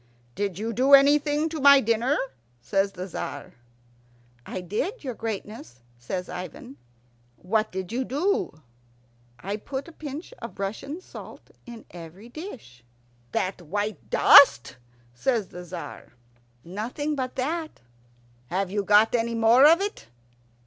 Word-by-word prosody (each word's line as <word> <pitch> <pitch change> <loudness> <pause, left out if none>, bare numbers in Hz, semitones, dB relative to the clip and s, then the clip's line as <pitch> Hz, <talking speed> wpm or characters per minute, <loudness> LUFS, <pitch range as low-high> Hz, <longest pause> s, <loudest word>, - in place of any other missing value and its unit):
"Did 200 0 -3
you 225 +3 -3
do 265 +4 +7
anything 290 +2 +3
to 315 -2 -5
my 280 0 +8
dinner?" 235 +4 +1 0.4
says 195 +10 0
the 185 0 -6
Tzar. 145 -5 -6 0.9
"I - - -4
did, 220 - -3
your 260 -3 -4
greatness," 210 - -7 0.2
says 180 +10 -4
Ivan. 185 +9 -8 0.6
"What 215 +4 -1
did 185 0 -5
you 250 +3 -1
do?" 280 - -1 0.7
"I 200 +10 -4
put 265 +5 -6
a - - -10
pinch 310 - -8
of - - -9
Russian 245 - -5
salt - - -12 0.2
in 235 -2 -10
every 175 +6 -11
dish." 240 - -10 0.5
"That 185 +4 -2
white 205 +6 -4
dust?" 130 - +7 0.4
says 220 - -1
the 180 - -9
Tzar. 175 -5 -9 0.5
"Nothing 230 - -4
but 260 -3 -3
that." 315 +5 -3 0.7
"Have 185 +3 -2
you 205 0 0
got 210 +2 +5
any 230 -1 0
more 230 +5 +6
of 335 +4 +5
it?" 410 +1 -4
225 Hz, 135 wpm, -25 LUFS, 185-280 Hz, 0.9 s, my